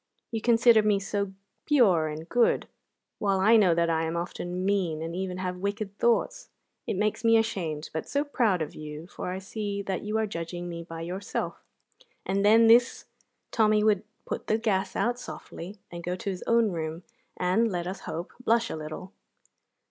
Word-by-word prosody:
You 225 -1 -2
consider 235 -1 +5
me 210 -1 +2
so 200 0 -2 0.4
pure 200 - +4
and 155 +1 -6
good, 240 +3 +2 0.5
while 195 -2 +1
I 215 +5 +6
know 190 -6 +5
that 170 0 +2
I 165 -1 +1
am 165 +1 -2
often 175 +1 -4
mean, 190 -6 +1
and 165 +1 -4
even 185 -1 -3
have 180 -1 -3
wicked 200 +1 -3
thoughts. - - +1 0.4
It - - -1
makes 210 +2 0
me 225 0 +6
ashamed, 175 -9 -2
but 160 - -4
so 285 +1 +1
proud 230 - +1
of 150 - -7
you, 150 +1 -8
for 180 - -6
I 185 - -3
see 200 +1 -4
that 190 -1 -2
you 210 +1 -2
are 220 - +1
judging 175 -2 -5
me 170 -1 -5
by 165 -1 -8
yourself." 185 +4 -4 0.6
And 195 +1 0
then 225 +2 +6
this 235 +2 +5 0.5
Tommy 215 -1 +3
would 210 -3 +3 0.2
put - - -5
the 215 - +2
gas 195 -4 0
out 245 +1 0
softly 195 -4 -8
and 170 0 -7
go 180 +1 -2
to 195 +2 -3
his 185 - -6
own 230 -2 +4
room, 160 0 -4 0.3
and, 200 +5 +2
let 175 -2 -2
us 185 +2 -4
hope, 170 +3 -6
blush 230 0 +2
a - - -3
little. 155 +5 -7
195 Hz, 185 wpm, -27 LUFS, 170-220 Hz, 0.6 s, I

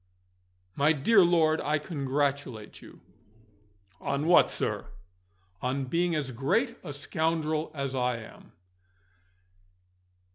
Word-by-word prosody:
"My 145 +3 +4
dear 190 +8 +5
lord, 160 -2 +3
I 150 +1 +1
congratulate 140 - -3
you." - - -15 1.0
"On 140 +2 -2
what, 175 +1 +6
sir?" - - -3 0.7
"On 130 +2 -1
being 170 +5 0
as 140 -4 -2
great 225 - 0
a 160 - -6
scoundrel 155 +2 -1
as 140 -2 -3
I 125 -2 0
am." 110 - -13
145 Hz, 105 wpm, -28 LUFS, 135-165 Hz, 1.0 s, what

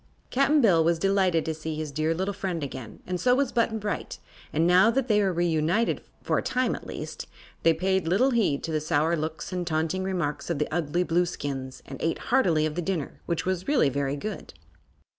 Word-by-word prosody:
Cap'n 280 +3 +4
Bill 175 -9 +5
was 170 +1 +2
delighted 190 -2 +2
to 160 - -1
see 155 0 -5
his 155 -1 -4
dear 155 +3 0
little 190 +4 -1
friend 185 -5 -3
again, 130 -5 -7
and 180 0 -3
so 250 0 +4
was 275 -1 +1
Button 230 -1 +1
Bright, 210 -1 -4 0.3
and 160 +2 +2
now 180 +5 +6
that 260 +2 0
they 210 -3 +3
were 195 -2 +2
reunited 175 +5 +1 0.2
for - - +1
a - - -2
time, 255 0 0
at - - -7
least - - -6 0.3
they 165 - +5
paid 190 +1 0
little 225 +11 +3
heed 215 - +1
to 165 - -3
the 155 -1 0
sour 155 +1 +1
looks 155 +1 -4
and 180 -1 -2
taunting 160 +3 0
remarks 175 -7 -2
of 170 - 0
the 150 - 0
ugly 175 +1 0
Blueskins 145 -7 -2
and 135 - -9
ate 165 - 0 0.2
heartily 170 -12 +4
of 155 - -2
the 175 - -2
dinner, 175 -5 -3
which 170 -2 -1
was 185 -1 -2
really 280 - +3
very 140 +1 -1
good. 200 - -6
170 Hz, 210 wpm, -26 LUFS, 155-195 Hz, 0.3 s, now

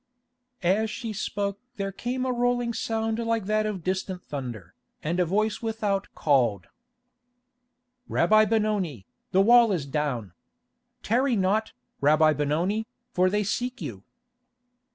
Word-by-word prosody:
As 205 +5 +2
she 225 0 -5
spoke 200 -1 -2 0.2
there 195 -2 -3
came 250 +6 -3
a 255 - 0
rolling 245 -1 +1
sound 225 0 -1
like 230 -3 0
that 215 +1 +1
of 195 -5 -4
distant 185 0 -2
thunder, 120 - -6 0.3
and 170 +4 -1
a 180 - +4
voice 210 +4 0
without 215 -4 -1
called: 125 -9 +2 1.4
"Rabbi 215 +5 +4
Benoni, 205 - 0 0.3
the 190 +1 +4
wall 235 +1 +6
is 170 -7 -1
down. 135 - -2 0.7
Tarry 245 +3 +2
not, 205 +3 +1 0.3
Rabbi 155 +2 +5
Benoni, 165 +10 0 0.2
for 185 -4 +3
they 210 +2 +1
seek 245 +6 -2
you." 100 -6 -6
200 Hz, 130 wpm, -26 LUFS, 160-225 Hz, 1.4 s, wall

